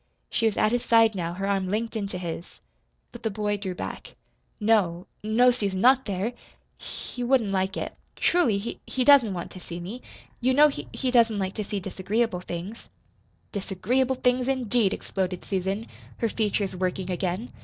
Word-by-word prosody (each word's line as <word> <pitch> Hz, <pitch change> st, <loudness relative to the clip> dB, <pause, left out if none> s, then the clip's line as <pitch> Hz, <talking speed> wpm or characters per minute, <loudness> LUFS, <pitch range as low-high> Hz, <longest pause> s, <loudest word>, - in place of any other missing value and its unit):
She 225 Hz, -, +2 dB
was 220 Hz, -, -1 dB
at 215 Hz, -, +3 dB
his 245 Hz, 0 st, +1 dB
side 225 Hz, -1 st, +5 dB
now, 170 Hz, -3 st, -3 dB
her 195 Hz, +2 st, -3 dB
arm 195 Hz, -2 st, +1 dB
linked 225 Hz, +3 st, -2 dB
into 200 Hz, -3 st, -3 dB
his. 170 Hz, -1 st, -6 dB, 0.5 s
But -, -, -10 dB
the 225 Hz, -, 0 dB
boy 210 Hz, 0 st, -1 dB
drew 190 Hz, -3 st, -4 dB
back. -, -, -7 dB, 0.4 s
"No, 200 Hz, -6 st, +2 dB, 0.2 s
no, 235 Hz, +4 st, +5 dB
Susan, 200 Hz, -6 st, -2 dB
not 260 Hz, +4 st, +5 dB
there. 200 Hz, +4 st, -2 dB, 0.5 s
He -, -, -9 dB
he 245 Hz, -, -1 dB
wouldn't 240 Hz, -5 st, +2 dB
like 190 Hz, 0 st, 0 dB
it. -, -, -4 dB, 0.2 s
Truly, 305 Hz, -, +3 dB
he 210 Hz, +4 st, -5 dB
he 260 Hz, -, 0 dB
doesn't 260 Hz, -9 st, +6 dB
want 170 Hz, -, -5 dB
to 185 Hz, -, -9 dB
see 170 Hz, -1 st, -7 dB
me. 200 Hz, +9 st, -7 dB, 0.4 s
You 255 Hz, +1 st, +2 dB
know 300 Hz, +2 st, +7 dB
he 280 Hz, -, -6 dB
he 260 Hz, -2 st, -1 dB
doesn't 230 Hz, -3 st, +4 dB
like 190 Hz, -1 st, -1 dB
to 215 Hz, -, -3 dB
see 200 Hz, 0 st, -3 dB
disagreeable 195 Hz, +2 st, -1 dB
things." 180 Hz, +6 st, -7 dB, 0.6 s
"'Disagreeable 245 Hz, +7 st, 0 dB
things,' 250 Hz, 0 st, +1 dB
indeed!" 245 Hz, -6 st, +2 dB
exploded 185 Hz, -3 st, -3 dB
Susan, 195 Hz, +3 st, -1 dB, 0.3 s
her 230 Hz, -, 0 dB
features 205 Hz, -3 st, -1 dB
working 185 Hz, 0 st, -2 dB
again. 185 Hz, +5 st, -2 dB
210 Hz, 180 wpm, -26 LUFS, 190-240 Hz, 0.6 s, know